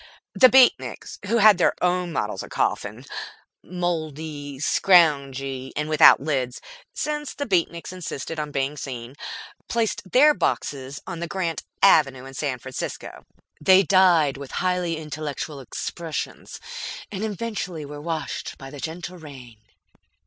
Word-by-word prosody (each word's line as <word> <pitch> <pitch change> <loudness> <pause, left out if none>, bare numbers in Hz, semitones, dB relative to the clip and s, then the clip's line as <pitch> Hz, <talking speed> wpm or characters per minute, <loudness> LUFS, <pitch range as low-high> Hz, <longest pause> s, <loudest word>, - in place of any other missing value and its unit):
The 255 - +7
Beatniks, 260 -1 +3
who 235 - +2
had 210 -4 +7
their - - +3
own 180 0 +1
models 105 -9 -2
of - - -9
coffin - - -2 0.6
mouldy, 155 -5 -4
scroungy, 135 -6 +2
and 150 0 -1
without 155 -1 +7
lids, 135 -3 -2 0.3
since 295 -1 -3
the 285 - -3
Beatniks 170 -4 -1
insisted 165 -3 -5
on 150 -1 -3
being 140 +1 -2
seen 125 -3 -6 0.6
placed 230 0 0
their 295 +4 +7
boxes 135 - -2
on 170 -3 -6
the 170 - -3
Grant 170 -2 -2 0.2
Avenue 135 -9 +5
in 135 - -10
San 135 -2 -2
Francisco. 130 +1 -7 0.4
They 190 +3 +7
died 175 -8 +4
with 140 -1 -9
highly 180 -2 0
intellectual 150 -1 -5
expressions, 155 +3 -5 0.5
and 200 0 -4
eventually 205 -7 -4
were 145 +1 -8
washed 160 0 -4
by 135 -1 -10
the 145 - -9
gentle 170 +4 -6
rain. 130 -8 -12
155 Hz, 135 wpm, -24 LUFS, 140-180 Hz, 0.6 s, The